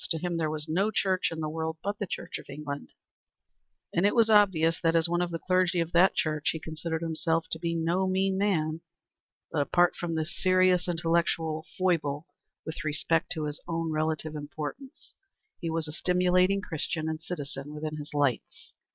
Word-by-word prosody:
To 165 - +1
him 175 +1 -2
there 160 -2 0
was 155 0 -3
no 185 +7 +2
Church 190 -4 +1
in 160 -1 -4
the 155 - -1
world 160 +1 -3
but 200 +1 -2
the 205 - -2
Church - - -5
of - - -14
England, 140 0 -6 1.0
and 170 - +2
it 205 - +3
was 225 -2 +5
obvious 180 -6 +4
that 165 0 +2
as 165 0 +4
one 175 +1 +1
of 175 - 0
the 170 - -3
clergy 185 0 +2
of 165 0 -1
that 180 +2 +5
Church 155 -1 0
he 160 - -4
considered 160 +1 -4
himself 165 0 0
to 160 - -2
be 170 0 -1
no 170 +3 +1
mean 190 +1 +1
man; 165 -5 +1 0.7
but 155 - +1
apart 175 +4 +3
from 170 -2 -3
this 160 0 -2
serious 185 -1 +3
intellectual 165 -2 0
foible 160 -5 +1 0.4
with 160 +1 -5
respect 155 +3 0
to 155 -3 -3
his 150 0 -5
own 165 -1 -1
relative 155 0 -1
importance, 150 - -7 0.5
he 170 - -3
was 160 -1 -1
a - - -5
stimulating 180 +3 +3
Christian 160 -1 -2
and 160 0 -3
citizen 145 -4 -6
within 155 0 -4
his 150 0 -7
lights. 145 -4 -1
165 Hz, 185 wpm, -28 LUFS, 155-180 Hz, 1.0 s, was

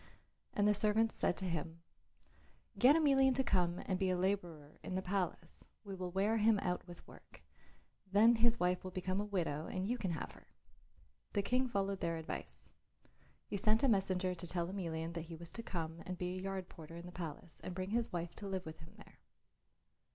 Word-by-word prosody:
And 205 0 +4
the 210 - +6
servants 215 +2 +3
said - - +1
to 190 - -3
him, 165 -1 -3 1.0
"Get 260 +4 +8
Emelian 270 -4 +5
to 265 - +2
come 180 -6 +1
and 185 -2 0
be 190 - +2
a 185 - +2
labourer 175 -6 -2
in 185 - -4
the 190 - 0
palace. 180 -3 -2 0.2
We 200 -2 -6
will 185 -1 -4
wear 200 +5 +2
him 220 0 +5
out 180 -2 -2
with 175 -1 -11
work, - - -15 0.7
then 225 +4 +6
his 235 +1 +4
wife 180 0 +1
will 185 - -4
become 185 +1 -1
a - - -2
widow 165 -7 -1
and 185 0 -2
you 245 +2 0
can 190 - -1
have 160 - -4
her." - - -17 0.9
The 200 - +2
King 255 +4 +2
followed 195 -4 -1
their 165 -1 -1
advice. 160 - -6 0.7
He 200 - -3
sent 215 +3 +3
a - - +6
messenger 190 -4 +2
to 175 0 -7
tell 170 0 0
Emelian 165 -4 -3
that 165 -1 -4
he 165 0 -8
was 170 +1 -9
to 230 - -5
come 165 -6 -4
and 185 0 -3
be 180 0 -2
a 185 - -4
yard 190 -1 -3
porter 165 -1 -11
in 170 +1 -8
the 180 - -8
palace 170 -1 -7
and 180 - -5
bring 185 +1 -3
his 235 +1 +1
wife 170 -1 -3
to 205 - -6
live 190 -1 -2
with 160 0 -8
him 160 0 -13
there. - - -16
185 Hz, 210 wpm, -36 LUFS, 170-205 Hz, 1.0 s, Get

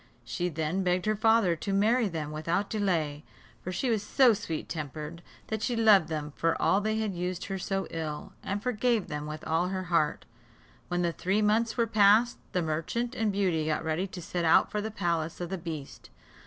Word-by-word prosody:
She 180 -1 -2
then 160 +3 -1
begged 180 -1 +1
her 215 0 +2
father 220 -4 +3
to 195 - -4
marry 220 +4 +3
them 160 -5 -4
without 165 +6 -1
delay; 165 -8 0 0.4
for 185 - -4
she 240 +7 -1
was 220 -3 +1
so 240 +3 +4
sweet 165 -7 -4
tempered, 155 +1 -6 0.3
that 220 -1 -2
she 245 - 0
loved 215 -7 +5
them 150 -2 -4
for 165 0 0
all 200 - +3
they 215 +1 0
had 215 -3 -1
used 180 0 -3
her 195 -1 -4
so 195 +1 -2
ill, 155 -2 -5
and 200 +1 -3
forgave 240 -3 +1
them 150 0 -4
with 155 0 -7
all 165 +3 +1
her 185 0 -3
heart. 155 -3 +1 0.6
When 175 0 -1
the 170 -1 0
three 195 +6 0
months 225 +3 +2
were 235 - +3
past, 215 +2 +4
the 180 - 0
merchant 165 +10 -2
and 220 -4 0
Beauty 180 -6 0
got 155 - 0
ready 160 +4 -1
to 180 -2 -8
set 175 +1 -3
out 160 - +4
for 210 - -1
the 220 - -3
palace 170 -6 -2
of 175 -1 -4
the 190 - -1
beast. 160 -5 -7
185 Hz, 205 wpm, -29 LUFS, 160-215 Hz, 0.6 s, loved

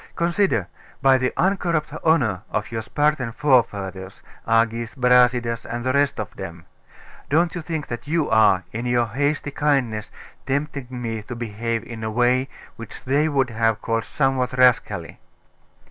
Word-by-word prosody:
Consider: 170 - +1 0.4
by 135 -1 +5
the 125 0 0
uncorrupt 175 -5 0
honour 120 - +2
of 105 +1 -3
your 115 -1 -2
Spartan 145 0 0
forefathers, 100 -9 0 0.2
Agis, 115 +1 +1
Brasidas, 125 -2 +3
and 120 +1 -5
the 130 - +1
rest 140 -3 +1
of 110 - -5
them, 85 -3 -8 0.6
don't 165 +4 +2
you 175 - -4
think 160 -2 -4
that 120 +3 -7
you 160 0 +1
are, 105 -4 +4
in 115 +3 -4
your 120 -1 +2
hasty 145 +5 -1
kindness, 130 -8 0 0.4
tempting 140 -1 -2
me 115 -3 -4
to 115 +3 -8
behave 115 0 -3
in 115 -2 -8
a 110 - -2
way 125 +4 +2 0.3
which 115 - -10
they 145 +4 +2
would 135 -4 +1
have 115 -1 +1
called 115 -1 0
somewhat 135 -3 0
rascally? 125 -1 +2
125 Hz, 150 wpm, -22 LUFS, 115-145 Hz, 0.6 s, by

